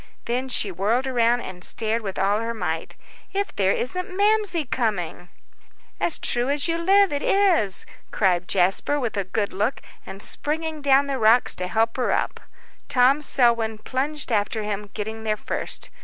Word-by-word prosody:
Then 250 +3 -2
she 210 -5 0
whirled 210 +8 0
around 240 -2 +2
and 180 -4 -8
stared 225 +3 -1
with 195 -3 -5
all 200 +2 +2
her 230 +1 -3
might, 165 -5 -3 0.4
"If 400 +1 -2
there 195 -1 +2
isn't 365 - -3
Mamsie 410 -6 +2
coming!" 195 -8 -2 0.7
"As 335 - +1
true 245 +2 -1
as 285 +2 +1
you 335 0 0
live 390 0 +4
it 285 - -1
is!" 355 - +2 0.2
cried 180 -3 +1
Jasper, 195 +10 +2
with 240 -5 -2
a 200 -2 -1
good 200 +2 -2
look, 210 +7 -1 0.2
and 195 - -9
springing 315 +1 -1
down 280 0 +4
the 275 -2 -3
rocks 225 +3 +4
to 180 - -2
help 225 +4 0
her 250 - 0
up. - - -1 0.5
Tom 270 +1 +4
Selwyn 235 -5 +2
plunged 270 +4 -3
after 215 0 0
him, 210 0 -4
getting 220 +1 -5
there 215 -1 0
first. - - -5
235 Hz, 170 wpm, -23 LUFS, 205-285 Hz, 0.7 s, live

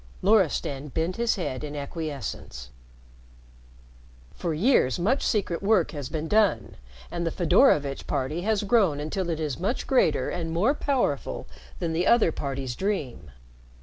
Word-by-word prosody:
Loristan 165 -8 +2
bent 165 +5 -2
his 235 -1 +1
head 150 -8 -4
in 150 0 -6
acquiescence. 140 - -6 1.6
"For 170 - -3
years 160 - +3
much 220 +11 +1
secret 195 -6 0
work 200 -4 +2
has 145 -4 -6
been 155 0 -3
done, 210 +1 +1 0.3
and 170 - -3
the 165 - 0
Fedorovitch 150 -4 +3
party 145 +4 -2
has 215 +1 0
grown 195 -8 +3
until 175 +4 -3
it 160 -2 -2
is 150 -4 -3
much 200 +8 -2
greater 160 - +2
and 165 -2 -3
more 195 - +2
powerful 280 -3 -1 0.3
than 170 -2 -2
the 170 +3 0
other 235 -8 +5
parties 135 -4 -4
dream. 150 - -3
165 Hz, 145 wpm, -26 LUFS, 145-200 Hz, 1.6 s, other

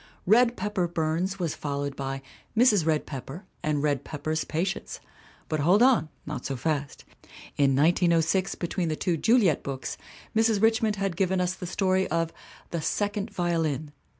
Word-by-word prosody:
Red 235 +4 +4
Pepper 190 -3 -1
Burns 170 +3 -1
was 170 -5 -1
followed 140 -1 -3
by 135 0 -4 0.3
Mrs. 210 -9 +5
Red 155 -2 +1
Pepper 140 - -7 0.2
and 150 -1 0
Red 145 -3 +1
Pepper's 155 +1 -3
Patients. 180 +5 -3 0.5
But 155 - -1
hold 180 +10 +5
on 250 -11 +4 0.2
not 150 - -5
so 135 - -3
fast. 145 +1 -3 0.5
In 140 -2 +3
1906, 170 +4 +2
between 175 0 -2
the 155 - 0
two 175 +2 0
Juliet 205 - +3
books, 135 -1 -5 0.4
Mrs. 225 -1 +3
Richmond 220 0 +3
had 195 -3 -2
given 190 +1 +1
us 180 0 +1
the 185 -1 -7
story 190 +1 +1
of 165 0 -1 0.4
The 170 - -2
Second 205 +5 -1
Violin. 165 -6 -1
170 Hz, 155 wpm, -27 LUFS, 150-195 Hz, 0.5 s, Mrs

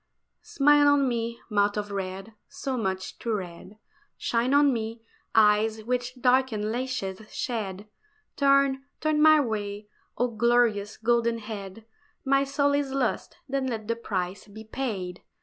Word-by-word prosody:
SMILE 290 +1 +4
on 285 -1 +4
me, 235 -1 -2
mouth 205 -1 +1
of 205 0 -3
red 195 +2 -5
so 280 -1 -4
much 190 -5 -3
too 230 - -2
red, 185 +1 -8 0.4
Shine 240 +2 0
on 285 -1 +5
me, 225 0 -4 0.3
eyes 220 0 +4
which 250 +2 -2
darkened 250 -4 +2
lashes 240 -6 -3
shade, 210 -4 -4 0.5
Turn, 275 -1 +3 0.2
turn 310 -1 +1
my 310 0 +7
way, 210 -4 -3 0.3
oh 245 +2 +1
glorious 230 -2 +1
golden 235 0 +1
head, 210 -1 -8 0.4
My 275 +1 +3
soul 280 +1 +1
is 285 -1 0
lost, 265 -4 -1
then 270 -1 -1
let 220 -4 -4
the 230 - 0
price 190 -4 -4
be 215 +2 -11
paid! 210 -7 -4
230 Hz, 140 wpm, -27 LUFS, 210-265 Hz, 0.5 s, my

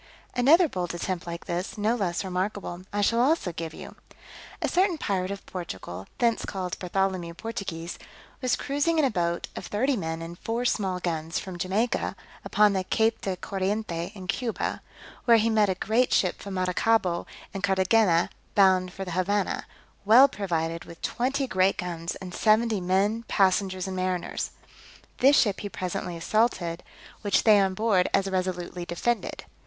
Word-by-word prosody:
Another 310 +8 +6
bold 180 - -3
attempt 175 0 -3
like 170 0 -6
this, 175 +5 -3
no 210 +2 +2
less 185 -6 -1
remarkable, 185 -1 -3
I 205 - 0
shall 230 +3 +2
also 260 - +2
give 165 -1 -5
you. - - -10 0.6
A - - 0
certain 365 -1 +2
pirate 190 -8 -1
of 200 0 -6
Portugal, 95 - -7
thence 235 -1 +2
called 185 -2 -4
Bartholomew 185 -2 -1
Portugues, 175 -6 -5 0.4
was 255 -3 +2
cruising 290 +4 0
in 310 - +4
a 260 - +1
boat 170 -3 -1
of - - -6
thirty 260 +7 +1
men 165 -5 -3
and 170 +1 -8
four 235 +2 -2
small 190 -6 0
guns 165 -2 -2
from 185 -3 -5
Jamaica, 205 +7 0 0.3
upon 210 -1 +4
the 190 -1 0
Cape 220 +4 +1
de 190 -2 -2
Corriente 190 -2 -2
in 190 -2 -8
Cuba, 230 +5 -2 0.4
where 235 -2 +7
he 225 +1 +2
met 215 -2 +3
a 190 - +1
great 225 +6 +1
ship 185 - +2
from 200 -1 -6
Maracaibo 185 0 +1 0.3
and 195 - -4
Carthagena, 190 -2 +3 0.2
bound 185 -2 +4
for 195 +1 -6
the 180 - -6
Havannah, 190 +3 0 0.4
well 235 +7 +8
provided 170 -8 -2
with 170 - -12
twenty 270 +3 0
great 190 -5 +2
guns 170 -1 -4
and 185 -2 -8
seventy 220 0 +3
men, 195 +5 +1
passengers 190 -1 +2
and 190 -1 -4
mariners; 185 -1 -2 0.7
this 275 +3 +6
ship 205 -4 +2
he 205 - -5
presently 180 -2 -4
assaulted, 180 -3 0 0.4
which 205 -2 +2
they 215 -2 +7
on 190 -1 +1
board 205 -4 +2
as 195 0 +1
resolutely 180 -2 -2
defended. 195 +8 -2
190 Hz, 165 wpm, -27 LUFS, 180-220 Hz, 0.7 s, well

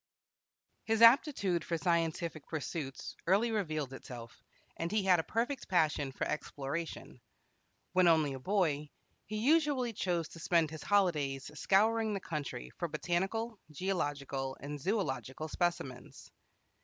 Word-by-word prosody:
His 225 +1 +2
aptitude 230 - +5
for 170 - -1
scientific 165 -2 0
pursuits 150 -3 -4
early 205 +6 +3
revealed 155 - -2
itself, 120 -3 -9 0.3
and 165 +1 -3
he 215 -1 +2
had 185 -2 +5
a - - 0
perfect 245 - -2
passion 155 -6 +2
for - - -3
exploration. 145 -2 -4 0.7
When 185 -1 +5
only 155 -4 +4
a 135 - -6
boy, 150 -3 0 0.4
he 215 - -3
usually 275 -1 +2
chose 175 -5 -1
to 165 - -11
spend 165 -1 +2
his 160 - -7
holidays 150 -9 +1
scouring 215 +6 +2
the - - -2
country 145 - -5
for - - 0
botanical, 195 +5 -1
geological, 145 -6 -2
and 145 +1 -6
zoological 155 - -2
specimens. 155 -7 -3
170 Hz, 130 wpm, -33 LUFS, 145-205 Hz, 0.7 s, aptitude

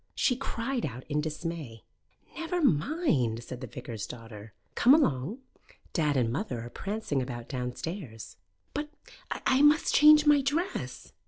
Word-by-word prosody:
She 250 - +2
cried 250 -1 -3
out 125 +3 -4
in 150 0 +1
dismay. 155 -6 -5 0.5
"Never 330 +2 -2
mind," 150 - +1
said 125 +1 -8
the 130 - -5
vicar's 110 -1 -6
daughter. 115 -3 -10 0.2
"Come 260 +4 +6
along. 185 - 0 0.5
Dad 150 -4 +1
and 115 -3 +1
mother 135 - -3
are 120 +1 -8
prancing 195 -9 -2
about 120 -2 -6
downstairs." 125 - -5 0.4
"But 295 +1 -3 0.4
I 265 +1 +1
must 295 +2 +5
change 300 0 +8
my 295 -1 +6
dress!" 325 +8 -3
155 Hz, 140 wpm, -29 LUFS, -, 0.5 s, change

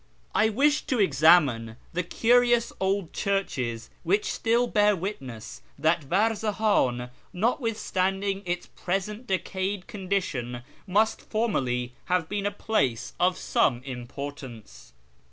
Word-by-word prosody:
I 220 - +4
wished 285 +7 +2
to 255 -5 0
examine 145 - +4 0.2
the 180 - 0
curious 240 +5 +3
old 190 -2 -1
churches 130 - -2
which 200 +5 +1
still 235 +2 +2
bear 210 -3 +3
witness 135 - -6 0.2
that 160 +1 +1
Varzahan, 205 - +1 0.2
notwithstanding 195 -3 0
its 175 -1 -3
present 210 +6 -4
decayed 190 0 -2
condition, 180 - -3 0.2
must 210 +4 +2
formerly 125 - -1
have 180 -2 +1
been 205 +1 -1
a - - +2
place 135 - -1
of 180 +1 +3
some 120 -2 +1
importance. 130 - -8
185 Hz, 110 wpm, -27 LUFS, 135-210 Hz, 0.2 s, I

